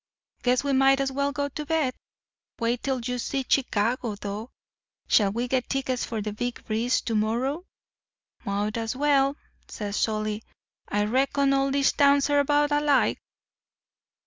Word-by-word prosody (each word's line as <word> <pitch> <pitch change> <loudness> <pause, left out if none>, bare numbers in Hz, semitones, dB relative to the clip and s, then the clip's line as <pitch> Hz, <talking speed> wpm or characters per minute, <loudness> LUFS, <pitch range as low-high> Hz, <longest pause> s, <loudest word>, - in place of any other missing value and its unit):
Guess 250 +1 +2
we 280 -1 0
might 270 0 +4
as 270 -1 0
well 280 +1 0
go 285 0 -2
to 300 +2 -5
bed. 300 -4 0 0.6
Wait 235 0 -1
till 265 -2 -1
you 250 +1 -3
see 270 +2 -2
Chicago, 235 -2 0
though. 205 +3 -6 0.6
Shall 200 -3 +4
we 235 +4 -2
get 255 0 -1
tickets 260 -2 -1
for 220 -3 -4
the 210 0 -4
Big 245 +3 -4
Breeze 230 +3 0
to 230 - -3
morrow?' 240 - 0 0.8
"'Mought 205 +1 -2
as 225 +1 -2
well,' 280 0 +2 0.3
says 205 -1 -5
Solly. 215 -1 -1 0.5
'I 205 0 0
reckon 275 +4 +2
all 275 0 +2
these 275 0 +2
towns 280 0 +3
are 290 - +4
about 290 +1 +2
alike. 290 -1 +2
255 Hz, 155 wpm, -26 LUFS, 225-280 Hz, 0.8 s, might